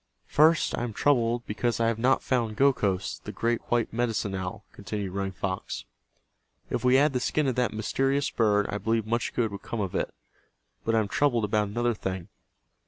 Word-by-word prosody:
"First 155 +2 +4
I - - -3
am 120 -2 -3
troubled 120 -2 +2
because 115 +3 -1
I 115 - +2
have 115 -1 0
not 130 +3 +3
found 115 -4 0
Gokhos, 105 -9 +1
the - - -7
great 120 0 0
white 120 -2 +1
Medicine 115 -4 -1
Owl," 95 -1 -5
continued 100 -3 -4
Running 100 0 -2
Fox. 95 -5 -4 0.9
"If - - -1
we 125 0 +5
had 145 +2 +4
the 125 - +1
skin 150 +4 0
of 130 - +1
that 125 -2 +2
mysterious 135 +6 0
bird 105 -3 +2
I 105 - -2
believe 115 0 0
much 115 0 -1
good 115 -4 +1
would 100 - -7
come 115 - -5
of 95 -3 -2
it. - - -1 0.7
But 115 - +1
I - - +5
am 105 - -2
troubled 120 0 +2
about 105 0 +1
another 120 +3 0
thing. 95 -4 -5
115 Hz, 195 wpm, -27 LUFS, 105-125 Hz, 0.9 s, we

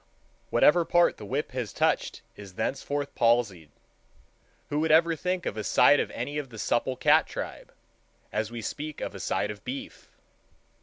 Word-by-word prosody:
Whatever 170 +3 +5
part 175 +1 +3
the 105 - -9
whip 140 +6 -2
has 125 -5 -4
touched - - 0
is 100 -3 -12
thenceforth 140 +5 -3
palsied. 115 -9 +1 1.0
Who 145 - -1
would 160 0 +1
ever 165 +1 +5
think 180 +2 -2
of 110 - -3
a 110 - -3
side - - +5
of - - -1
any 145 +1 -4
of 140 -3 -6
the 115 - -11
supple 120 +4 0
cat - - +4
tribe, - - -7 0.6
as 110 0 -1
we 115 -1 -7
speak 150 +7 -5
of - - -4
a - - -8
side 105 - -1
of 105 -1 -11
beef? 130 +3 -7
130 Hz, 170 wpm, -27 LUFS, 110-150 Hz, 1.0 s, Whatever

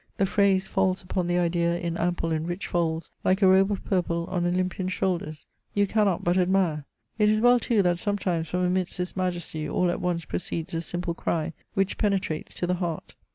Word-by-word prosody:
The 195 - +3
phrase 195 -1 +3
falls 190 -1 0
upon 180 -1 -2
the 175 0 +1
idea 170 0 +1
in 170 -1 -3
ample 170 -1 -1
and 160 +1 -1
rich 175 +2 -4
folds, 165 -2 -1
like 190 +2 +2
a - - +7
robe 190 +1 +5
of 200 - -3
purple 170 -3 0
on 175 -1 0
Olympian 185 +1 -1
shoulders. 170 -5 -2 0.3
You 205 0 +4
cannot 200 -3 +1
but 175 +1 +2
admire. 180 -5 +1 0.3
It 210 0 +5
is 215 0 +3
weU 245 +1 +5
too 220 -4 +2
that 175 -1 +1
sometimes 185 -5 -1
from 180 +3 -1
amidst 180 0 0
this 180 0 -3
majesty 175 -4 -2
all 180 +3 +1
at - - -4
once 170 -2 -1
proceeds 170 0 -4
a 165 - -1
simple 175 0 -3
cry, 165 -1 -2 0.2
which 195 0 0
penetrates 195 -6 -1
to - - -2
the 180 - +1
heart. 170 -3 -3
180 Hz, 200 wpm, -26 LUFS, 170-190 Hz, 0.3 s, a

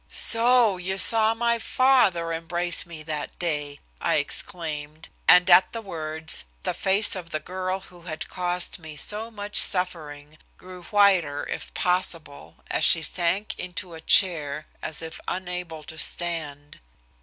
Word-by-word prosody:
"So 230 -3 +4
you 190 +2 -3
saw 220 +2 +4
my 235 0 0
father 220 -11 +2
embrace 170 +2 -1
me 160 -2 -10
that 150 -1 -6
day!" 150 -4 -3 0.2
I - - +1
exclaimed, 155 -2 -4 0.2
and 180 0 +6
at 185 - +5
the 230 - -5
words 160 - 0 0.2
the - - -2
face 195 +3 +3
of 175 -3 -8
the 155 - -3
girl 185 +3 -4
who 180 -2 -16
had 165 -2 -7
caused 180 0 -2
me 160 -2 -11
so 210 +9 -3
much 205 -2 -2
suffering 155 -5 +1 0.2
grew 185 0 -12
whiter, 185 -9 +2
if - - -6
possible, 165 - -2
and - - -1
she 165 - +5
sank 185 +5 0
into 180 -1 -6
a 160 - -10
chair, 155 -5 +3 0.2
as 160 +1 -3
if 160 - -9
unable 180 -3 -5
to 160 +1 -10
stand. 150 -5 -3
175 Hz, 145 wpm, -24 LUFS, 155-190 Hz, 0.2 s, and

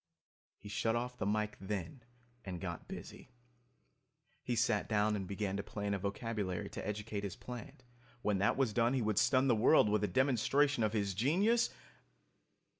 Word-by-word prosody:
He 100 - -12
shut 115 +2 0
off 125 +1 -2
the 95 - -1
mike, 105 0 -1
then, 95 +3 -4 0.4
and 90 -3 -5
got 85 -3 -5
busy. - - -9 1.1
He 120 - -2
sat 115 -3 +1
down 105 0 +2
and 95 -2 -4
began 100 0 -2
to - - -1
plan 100 0 -3
a 100 - -1
vocabulary 100 -2 -3
to - - -5
educate 105 0 -3
his 100 -3 -4
plant. 125 +1 -9 0.4
When 105 -2 +1
that 100 - +2
was 130 -6 +1
done 120 +3 +2
he 130 - +1
would 105 -1 +2
stun 130 +3 +3
the 125 - +5
world 110 +1 +5
with 105 0 +1
a - - +2
demonstration 130 +2 +2
of 110 0 +1
his 100 -3 0
genius 185 - +3
105 Hz, 175 wpm, -34 LUFS, 100-125 Hz, 1.1 s, the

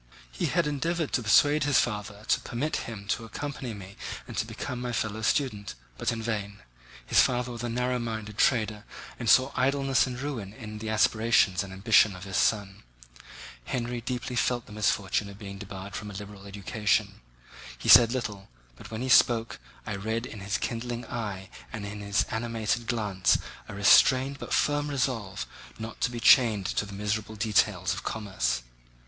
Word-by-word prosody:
He - - -2
had 170 -2 +1
endeavoured 160 +2 -1
to 125 - +2
persuade 145 +7 +4
his 145 -2 +3
father 105 -2 -3
to - - +4
permit 140 +2 -3
him 100 -3 -8
to 115 - 0
accompany 130 0 -5
me 100 -1 -11 0.3
and - - -8
to - - -1
become 125 -1 -5
my 125 0 -3
fellow 110 -1 -2
student, 110 -3 -1 0.2
but - - 0
in 115 -1 -4
vain. 105 -3 -3 0.5
His - - +5
father 125 0 0
was 120 -1 -6
a 120 - -2
narrow 125 +1 0
minded 110 -3 -5
trader 110 -4 +2 0.4
and 115 -3 -1
saw 130 +4 +5
idleness 135 0 +2
and 125 -1 -5
ruin 125 -8 -5
in 105 -3 -8
the 110 0 -5
aspirations 110 -3 +3
and 95 - -9
ambition 100 +1 +4
of 90 - -10
his 95 -1 -3
son. 100 -3 +1 0.8
Henry 120 -1 -3
deeply 125 +1 -4
felt 120 0 0
the - - -15
misfortune 105 -1 0
of 100 - -11
being 100 -2 -8
debarred 95 -1 -8
from 105 - -5
a 100 - -9
liberal 100 0 -9
education. 100 +2 -1 0.6
He - - -7
said 120 -2 +9
little, 105 -6 -4 0.3
but 105 - -12
when 110 +2 -4
he - - -2
spoke 115 -2 +4 0.3
I 105 - -3
read 110 +4 -2
in 110 - -8
his 100 +2 -2
kindling 120 +1 -4
eye 100 -5 -5 0.2
and 110 -3 -5
in 105 +1 -6
his 100 0 +1
animated 115 0 -2
glance 105 -5 +2 0.3
a - - -7
restrained 130 +6 +5
but - - -8
firm 145 0 +2
resolve 125 -8 -2 0.3
not 110 0 -8
to - - +2
be 120 -1 -5
chained 110 -4 +5
to 105 - -1
the 100 - -9
miserable 105 +2 -3
details 110 -1 +1
of - - -5
commerce. 100 - -2
110 Hz, 180 wpm, -28 LUFS, 100-125 Hz, 0.8 s, said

